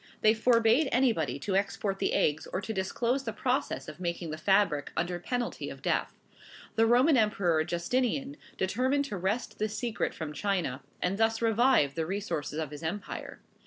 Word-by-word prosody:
They 215 0 +6
forbade 230 +4 +3
anybody 225 - +2
to 195 +3 -1
export 195 0 -1
the - - 0
eggs 150 +1 +1
or - - -3
to 210 +3 -4
disclose 235 +7 -1
the 230 - -3
process 250 +4 -1
of - - -9
making 170 -2 -3
the 155 - -4
fabric, 190 -6 +2
under 175 +1 -1
penalty 245 +7 -3
of - - -10
death. - - 0 0.6
The 225 0 +4
Roman 255 +5 +5
Emperor 195 -8 +2
Justinian 250 - -1 0.2
determined 260 +9 +1
to 210 -8 -4
wrest 195 +7 -2
this 215 0 -2
secret 235 -1 -2
from 155 -2 -5
China, 170 -6 -1 0.2
and 190 +3 0
thus 225 0 +2
revive 230 - +3
the 160 0 -2
resources 175 -6 -3
of 155 -3 -3
his 150 - -8
empire. 175 +6 -5
205 Hz, 170 wpm, -29 LUFS, 170-240 Hz, 0.6 s, They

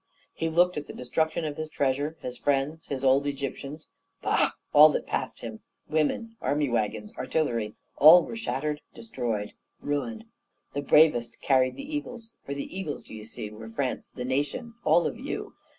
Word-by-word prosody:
He 165 - -1
looked 175 +2 +3
at 145 -1 -4
the - - -8
destruction 160 +6 -1
of 150 -1 -4
his 155 0 -4
treasure, 145 +2 0
his 125 -1 -5
friends, 145 +4 -1
his 135 -1 -3
old 135 +2 +4
Egyptians. 140 +2 -5 0.4
Bah! - - +3 0.2
all 150 +1 +10
that - - -1
passed - - -3
him, - - -6 0.3
women, 160 +9 0
army 145 -1 +1
waggons, 120 - -1
artillery, 115 -9 -1 0.2
all 165 +4 +9
were - - -6
shattered, 150 - -2
destroyed, 115 - -3 0.3
ruined. 220 +11 -3 0.5
The 145 - -1
bravest 140 -5 +4
carried 130 -2 +3
the 280 +2 -6
eagles; 240 -6 -6
for 140 - -5
the 140 - -6
eagles, 185 -7 -4
d'ye 110 - -9
see, 105 -1 -7
were 110 +1 -9
France, 125 +3 -3
the 125 - -4
nation, 145 - -2
all 165 +2 +4
of 230 - -3
you! 280 +4 -5
145 Hz, 165 wpm, -27 LUFS, 130-165 Hz, 0.5 s, all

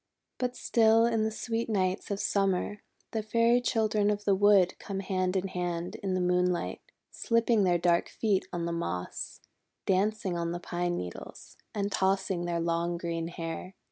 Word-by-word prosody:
But 250 0 -1
still 225 0 +4
in 225 -2 +1
the - - +1
sweet 225 +1 -3
nights 190 -2 0
of 200 -1 -2
Summer 195 +1 0 0.3
the 220 - -1
Fairy 230 +3 +3
Children 215 -3 +1
of 205 0 -1
the 200 - +4
Wood 195 -2 +5
come 195 -1 -4
hand 185 -1 -1
in 190 0 0
hand 175 -1 -3
in 190 -2 -2
the - - +1
moonlight, 180 0 +1 0.3
slipping 230 -3 +2
their 175 -1 +3
dark 170 0 +2
feet 205 -4 0
on 175 -1 -2
the 170 - -2
moss, 90 - -4 0.4
dancing 195 0 +1
on 170 0 -1
the 175 - -3
pine 175 0 -2
needles, 90 -1 -8 0.2
and 200 -1 -1
tossing 190 -1 +1
back - - -3
their 170 -1 -1
long 170 +1 0
green 165 -1 -3
hair. 170 +2 -6
190 Hz, 175 wpm, -29 LUFS, 175-215 Hz, 0.4 s, Wood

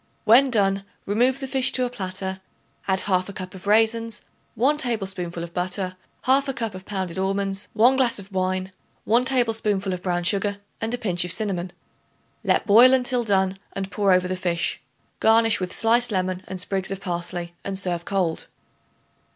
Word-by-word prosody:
When 255 +5 +6
done, 195 -4 +1 0.2
remove 245 +6 +2
the 270 - -3
fish 265 -1 +2
to 255 - +1
a - - -2
platter; 190 -3 -4 0.5
add 190 -1 +2
1/2 185 0 -1
cup 185 +1 -7
of 190 +1 -11
raisins, 225 +1 +2 0.3
1 270 +7 +2
tablespoonful 190 - -2
of 170 0 -9
butter, 185 +1 -2 0.3
1/2 270 +1 +2
cup 225 -4 -3
of 185 0 -10
pounded 190 -3 -4
almonds, 195 0 -1
1 245 +4 +4
glass 255 -3 +2
of 200 0 -8
wine, 185 0 -1 0.3
1 235 +3 +2
tablespoonful 225 -6 +1
of 180 - -5
brown 175 -1 -1
sugar 200 +2 0 0.2
and 225 0 -2
a - - -7
pinch 180 -7 +2
of 180 - -1
cinnamon. 185 -4 -1 0.7
Let - - +1
boil 240 +5 +7
until 250 -1 0
done 190 -3 +1
and 195 0 -5
pour 200 -2 +2
over 180 0 +3
the 185 - -2
fish. 175 -2 -2 0.4
Garnish 225 0 +4
with 185 -1 -3
sliced 235 +1 +2
lemon 185 -1 -1
and 190 - -5
sprigs 190 +1 -2
of 195 -1 -4
parsley 175 -1 -4
and 195 -1 -3
serve 180 -3 -1
cold. 180 -4 -1
195 Hz, 175 wpm, -23 LUFS, 185-225 Hz, 0.7 s, boil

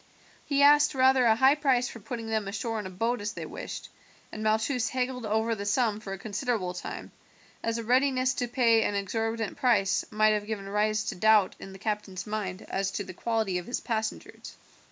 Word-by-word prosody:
He 280 -1 +3
asked 290 0 +6
rather 260 -1 +4
a 220 - +5
high 265 +4 +5
price 265 -5 +2
for 230 - -9
putting 230 +2 -6
them 220 -2 -1
ashore 220 +3 -3
in 205 - -5
a - - -7
boat 230 +5 -1
as 210 +1 -3
they - - -6
wished, - - -7 0.4
and 215 - -7
Malchus 220 +2 +1
haggled 250 -2 -2
over 220 +2 +1
the 200 -2 -5
sum 215 -1 +1
for 205 -2 -8
a 195 - -4
considerable 205 -2 -2
time, 180 - -7 0.5
as 230 0 -1
a 230 - -4
readiness 255 +2 +2
to 245 - -2
pay 235 -2 +3
an 205 - 0
exorbitant 225 +2 -2
price 215 -6 +2
might 215 0 +3
have 210 -1 -2
given 205 -3 -4
rise 210 +1 +1
to - - -3
doubts 215 0 +3
in 195 - -9
the 190 - -10
captain's 200 -3 -4
mind 210 -3 -4
as 195 0 -2
to 195 +1 -3
the 185 -1 -9
quality 220 -3 -1
of 180 - -10
his 245 - -2
passengers. 220 -2 -4
220 Hz, 205 wpm, -28 LUFS, 205-245 Hz, 0.5 s, asked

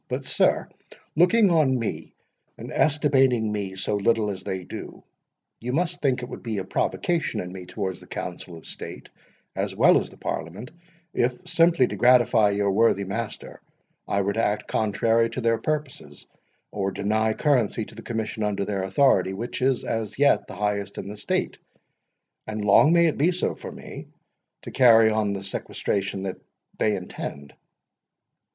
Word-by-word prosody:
But, - - -4
sir, - - +2 0.5
looking 185 +5 +4
on 150 -6 +3
me, 115 -3 -5 0.4
and - - -8
estimating 135 -7 +2
me 100 -2 -4
so 95 +2 -1
little 105 +1 +1
as 95 - -6
they 95 -1 -4
do, - - -9 0.6
you 125 +2 -4
must 175 +3 0
think 130 -3 +1
that - - -4
it - - -13
would - - -7
be 115 -3 -4
a 95 - -2
provocation 165 - -1
in 90 0 -6
me 90 -1 -9
towards 95 -2 -4
the - - -16
Council 90 -1 -7
of 80 - -15
State, - - -9 0.5
as - - -2
well - - +5
as - - -6
the - - -17
Parliament, 90 - -5 0.4
if, 125 +1 -1
simply 165 -5 +4
to - - -5
gratify 120 -3 +5
your 100 0 +1
worthy 100 -1 +3
master, 105 +3 -6 0.5
I 100 - +1
were 100 +1 0
to 115 - 0
act 105 0 -1
contrary 115 +2 +1
to 115 - -5
their 115 -1 +1
purposes, 150 -3 -4 0.5
or 100 -1 -2
deny 110 +3 0
currency 120 -6 +1
to - - -14
the 115 - -10
commission 110 -1 -4
under 105 -1 -1
their 100 -2 -2
authority, 95 -1 +2
which 115 +6 -5
is 130 0 +1
as 110 -2 -3
yet 145 +1 +3
the - - -9
highest 100 -1 -2
in - - -6
the 105 - -7
State—and 105 0 -6
long 125 +9 +6
may 170 0 +5
it 160 - 0
be 165 +5 +4
so 180 - -1
for - - -9
me!—to - - -13
carry 115 -4 +6
on 105 -2 0
the 100 0 -5
sequestration 100 0 -3
which 95 -1 -4 0.4
they 105 -1 +2
intend. 70 -6 -7
110 Hz, 170 wpm, -25 LUFS, 100-125 Hz, 0.6 s, long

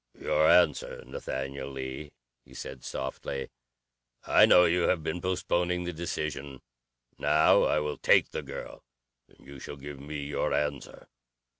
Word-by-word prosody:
"Your 80 - +2
answer 90 - +3
Nathaniel 70 +1 -5
Lee," 65 +2 -6 0.3
he - - -17
said 65 -1 -8
softly. 65 +1 -5 0.7
"I - - +6
know 90 - +7
you 85 +1 +2
have 85 -4 +1
been 90 +2 -3
postponing 90 -1 0
the 90 0 -4
decision. 75 -4 -5 0.6
Now 75 +2 +4
I - - +2
will 75 0 -4
take - - +4
the - - -3
girl, - - -9 0.4
and - - -23
you 70 0 -11
shall 70 - -8
give 70 0 -9
me 75 +1 -6
your 70 +1 -1
answer. 75 -1 -3
75 Hz, 145 wpm, -28 LUFS, 70-85 Hz, 0.7 s, know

